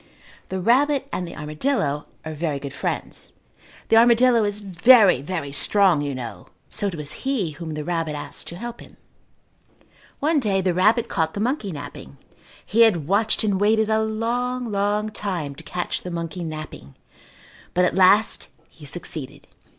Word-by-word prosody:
The 190 - -3
rabbit 270 +7 +2
and 180 - -2
the - - -9
armadillo 150 - -2 0.2
are 160 - -4
very 155 -2 -2
good 140 -1 -7
friends. - - -4 0.6
The 225 - +5
armadillo 235 0 +5
is 205 0 -1
very, 195 - +5
very 145 -2 -4
strong, 170 +3 +3
you 140 -2 -3
know, 115 -8 -7 0.2
so 205 -2 -1
it 190 - -3
was 150 -2 -5
he 255 - 0
whom 155 +1 -7
the 150 - -4
rabbit 165 -2 -2
asked 145 - -6
to 170 - -6
help 240 +5 -7
him. - - -15 1.2
One 305 +1 +2
day 205 -6 +1
the 185 -1 +1
rabbit 215 +6 +3
caught 160 -6 -1
the - - -3
monkey 225 -3 -1
napping. 145 - -9 0.5
He 225 +3 +2
had 180 -10 +4
watched 215 +5 +2
and 200 -2 0
waited 220 +1 +3
a 220 0 +2
long, 235 +2 -2
long 205 +1 0
time 185 -9 -4
to 155 +4 -13
catch 175 +2 -3
the 180 - -6
monkey 170 +1 -4
napping, 155 - -8 0.8
but 180 0 +4
at - - +1
last 195 +3 +4 0.2
he 150 -3 -12
succeeded. 155 -3 -6
185 Hz, 165 wpm, -23 LUFS, 155-220 Hz, 1.2 s, The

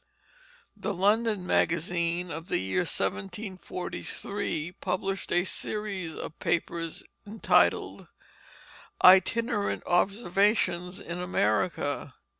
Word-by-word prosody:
The 205 - -3
London 210 +1 +2
Magazine 170 +1 +1
of 165 +3 -6
the - - +1
year 95 - -1
1743 175 - -4
published 195 +1 -2
a 175 0 +3
series 195 -4 -3
of 155 - -7
papers 165 -1 -2 0.2
entitled 215 +2 +2 1.0
Itinerant 205 +4 +4
Observations 190 -1 +1
in 170 +1 -6
America. 145 - 0
180 Hz, 80 wpm, -28 LUFS, 170-200 Hz, 1.0 s, Itinerant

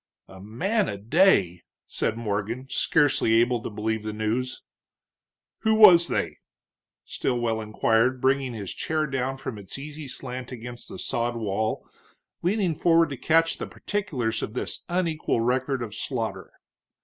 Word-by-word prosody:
"A 95 0 -13
man 190 - 0
a 100 - -4
day!" 105 - +3 0.2
said 115 - -1
Morgan, 110 +3 -3
scarcely 145 -7 +2
able 120 +1 +3
to - - -5
believe 110 +1 -2
the 110 0 -4
news. 115 +4 -2 1.0
"Who 220 -1 +2
was 175 -6 +8
they?" - - -2 0.7
Stilwell 120 -3 -1
inquired, 115 +3 +1
bringing 130 -1 +1
his 100 -4 -5
chair 155 -1 -1
down 135 -1 -2
from 115 -5 -6
its 100 +4 -7
easy 150 +1 -8
slant 125 -1 -5
against 120 0 -8
the - - -7
sod 120 -1 -2
wall, 110 -1 -2 0.5
leaning 185 -1 +1
forward 165 +1 +3
to 135 - -4
catch 165 +5 +2
the - - -4
particulars 140 - -2
of 110 - -5
this - - -3
unequaled 165 -9 0
record 130 +1 0
of 110 -3 -7
slaughter. 110 -5 -4
125 Hz, 145 wpm, -26 LUFS, 110-155 Hz, 1.0 s, was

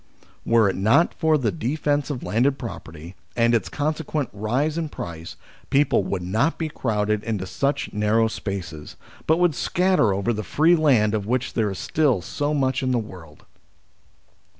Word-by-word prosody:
Were, 115 -2 +4
it 95 - 0
not 110 - +3
for 160 -2 +2
the 125 -6 0
defence 145 0 -1
of 135 -4 -4
landed 130 +5 +1
pro 120 -4 -6
perty 80 +2 -11 0.2
and 115 0 +3
its 115 - +1
consequent 155 -1 -2
rise 125 +9 -1
in 165 -2 -2
price, 85 - -7 0.3
people 140 -6 +3
would 95 -2 -3
not 110 - 0
be 160 -1 -2
crowded 105 -6 -1
into 105 -5 -3
such 140 +8 -2
narrow 105 +2 +2
spaces, 90 -8 -6 0.3
but 160 - +4
would 175 -2 +3
scatter 175 - +2
over 100 +5 0
the 110 - -3
free 160 +10 +3
land 125 -10 +3
of 105 -2 -2
which 125 +1 -1
there 110 -3 +1
is 95 - -5
still 140 -5 +1
so 145 +9 -2
much 135 -2 0
in 130 - -1
the 125 - +2
world. 90 -9 -9
120 Hz, 175 wpm, -23 LUFS, 105-145 Hz, 0.3 s, Were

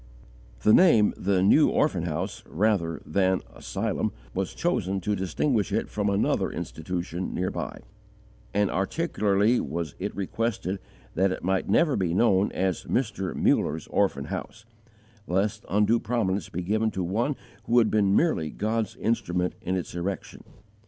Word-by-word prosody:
The 105 - +6
name 115 - +6
"The 95 -1 +1
New 150 +10 +6
Orphan 95 - +1
House" 85 +4 -3
rather 95 -3 0
than 95 -1 +1
"Asylum" - - -2 0.2
was - - -3
chosen 95 +2 0
to 105 +4 0
distinguish 100 - 0
it - - -1
from 105 -1 -1
another 100 +1 +1
institution, 85 +2 -4
near 90 +1 -1
by; - - -5 0.7
and 100 0 +1
particularly 105 - +1
was 85 -1 -3
it 100 +2 -4
requested 100 -1 -2 0.3
that 95 +2 +2
it - - -5
might 95 +1 0
never 160 -5 +3
be 90 -3 0
known 100 -2 +3
as 95 -1 -1
"Mr. 105 -7 -1
Muller's 80 +1 +1
Orphan - - +1
House," 110 0 -6 0.6
lest 95 +4 0
undue 105 +3 +3
prominence 100 -7 -1
be 90 - -4
given 110 +4 +1
to 95 -3 -3
one 115 +11 0 0.3
who 120 - +2
had 115 -3 +4
been 100 -2 +3
merely 155 - +2
God's 110 +5 -2
instrument 95 -6 -1
in 95 - -1
its 90 - -4
erection. 90 +2 -4
100 Hz, 145 wpm, -26 LUFS, 90-110 Hz, 0.7 s, The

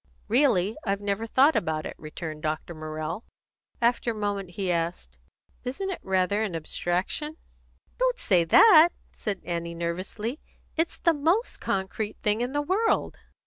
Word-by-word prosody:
"Really, 220 -5 +3
I've 195 -1 0
never 205 +2 -2
thought 275 +7 +5
about 155 -2 -1
it," - - -5
returned 155 0 -7
Dr. 155 +2 -3
Morrell. 155 +5 -5 0.6
After 240 0 +2
a 230 - -1
moment 205 -3 -2
he 190 -3 0
asked, 165 - -3 0.4
"Isn't 275 +10 -3
it 365 - -4
rather 190 +2 +1
an 205 -6 -2
abstraction?" 180 - -2 0.6
"Don't - - +2
say 180 - +3
that!" 325 - +8 0.2
said 200 -4 -4
Annie 170 -1 -3
nervously. 185 - -3 0.4
"It's 325 +1 0
the 335 - +3
most 335 +10 +1
concrete 195 +2 -2
thing 210 +2 0
in 245 +1 -1
the 290 +1 0
world!" 400 +9 +1
205 Hz, 145 wpm, -27 LUFS, 170-275 Hz, 0.6 s, that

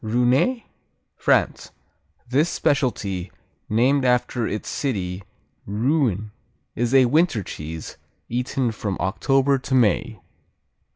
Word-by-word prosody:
Rouennais 125 - +2 0.5
France - - +1 0.6
This 145 +7 +2
specialty, 100 -10 -1 0.4
named 130 +6 +3
after 125 -1 +1
its 105 - -4
city, 95 -9 -2 0.5
Rouen, 110 - 0 0.4
is 120 +2 0
a 130 -1 +7
winter 150 - +2
cheese, 80 -1 -7 0.3
eaten 125 +1 -1
from 100 -3 -4
October 135 +8 +2
to 130 +1 -2
May. 110 -8 +2
120 Hz, 100 wpm, -23 LUFS, 105-135 Hz, 0.6 s, a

